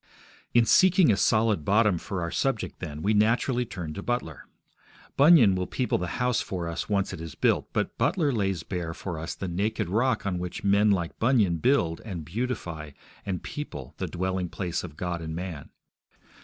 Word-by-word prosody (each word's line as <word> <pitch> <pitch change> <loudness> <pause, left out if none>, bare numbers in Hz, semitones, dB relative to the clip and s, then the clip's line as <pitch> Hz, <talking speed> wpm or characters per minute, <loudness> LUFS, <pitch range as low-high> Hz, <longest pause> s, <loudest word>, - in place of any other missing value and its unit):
In 120 -1 +6
seeking 185 - +5
a - - +3
solid 110 -3 +2
bottom 105 0 +3
for 95 -1 -4
our 85 - -3
subject, 135 -5 -1
then, 75 -3 -6
we 105 - +2
naturally 120 +3 +2
turn 85 -6 -6
to 100 - -6
Butler. 120 -11 -3 0.7
Bunyan 140 - +7
will 90 0 -2
people 125 - -1
the 90 - -2
house 125 -1 +1
for 90 -3 -4
us 85 +5 -4
once 100 -2 0
it - - -7
is 80 -2 -7
built, - - +1
but - - -2
Butler 160 -7 +2
lays 95 -7 -1
bare 85 -3 -4
for 85 -5 -5
us 80 +1 -5
the 95 - -5
naked 100 +2 -1
rock 120 +6 +1
on 90 -3 -1
which 90 +1 -5
men 100 +1 +4
like 90 -5 0
Bunyan 110 -8 +3
build 85 - +1
and 90 -8 -6
beautify 85 - -4 0.3
and 95 -3 -3
people 150 0 -7
the - - -2
dwelling 95 0 -2
place 90 -2 -3
of 80 -4 -9
God 90 -2 -3
and 80 -1 -5
man. 85 -5 -6
95 Hz, 185 wpm, -27 LUFS, 85-115 Hz, 0.7 s, Bunyan